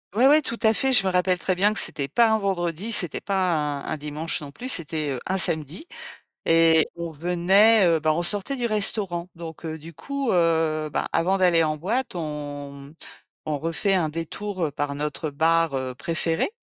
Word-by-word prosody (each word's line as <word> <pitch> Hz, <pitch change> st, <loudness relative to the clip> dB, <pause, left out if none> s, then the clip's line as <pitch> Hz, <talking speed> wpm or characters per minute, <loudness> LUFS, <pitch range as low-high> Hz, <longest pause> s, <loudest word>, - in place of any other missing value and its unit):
ouais 250 Hz, +4 st, +5 dB
ouais, 300 Hz, +2 st, +6 dB
tout 235 Hz, -3 st, -4 dB
à 220 Hz, 0 st, +5 dB
fait. 265 Hz, +3 st, +1 dB
Je 205 Hz, -6 st, +5 dB
me -, -, +1 dB
rappelle 180 Hz, 0 st, +1 dB
très 185 Hz, -, 0 dB
bien 205 Hz, +4 st, +2 dB
que -, -, +1 dB
c'était 140 Hz, -2 st, -1 dB
pas 230 Hz, -, +3 dB
un 220 Hz, -, +3 dB
vendredi, 190 Hz, +1 st, -2 dB
c'était 175 Hz, -7 st, 0 dB
pas 190 Hz, -3 st, 0 dB, 0.3 s
un -, -, -10 dB
un -, -, -2 dB
dimanche 150 Hz, +3 st, -3 dB
non 145 Hz, -1 st, -8 dB
plus, 250 Hz, -, -7 dB
c'était, 155 Hz, -, -2 dB
heu, 130 Hz, -, -3 dB
un 190 Hz, +1 st, -1 dB
samedi 160 Hz, -, -1 dB, 0.6 s
et 165 Hz, -1 st, +4 dB
on 170 Hz, -1 st, -5 dB
venait, 180 Hz, +7 st, +4 dB
heu, 165 Hz, -2 st, +3 dB
bah 155 Hz, 0 st, +2 dB
on 170 Hz, -, -1 dB
sortait 205 Hz, +8 st, +2 dB
du 245 Hz, -, -4 dB
restaurant. 200 Hz, -5 st, 0 dB
Donc, 165 Hz, -1 st, -10 dB
heu, 160 Hz, 0 st, -4 dB
du 165 Hz, +3 st, -11 dB
coup, 275 Hz, -, -4 dB
heu, 160 Hz, -3 st, +1 dB
bah, -, -, -2 dB
avant 180 Hz, +4 st, +1 dB
d'aller 175 Hz, -3 st, +3 dB
en 155 Hz, -1 st, -1 dB
boîte, 225 Hz, -, -2 dB
on 145 Hz, -3 st, -6 dB
m 150 Hz, -, -18 dB, 0.5 s
on 150 Hz, -2 st, -2 dB
refait 165 Hz, +6 st, -1 dB
un 170 Hz, -5 st, +1 dB
détour, 175 Hz, +4 st, -4 dB
heu, -, -, -4 dB
par 145 Hz, 0 st, -3 dB
notre 150 Hz, +1 st, -4 dB
bar, 165 Hz, 0 st, +2 dB
heu, 130 Hz, -1 st, -3 dB
préféré 165 Hz, +4 st, -1 dB
170 Hz, 205 wpm, -24 LUFS, 155-195 Hz, 0.6 s, ouais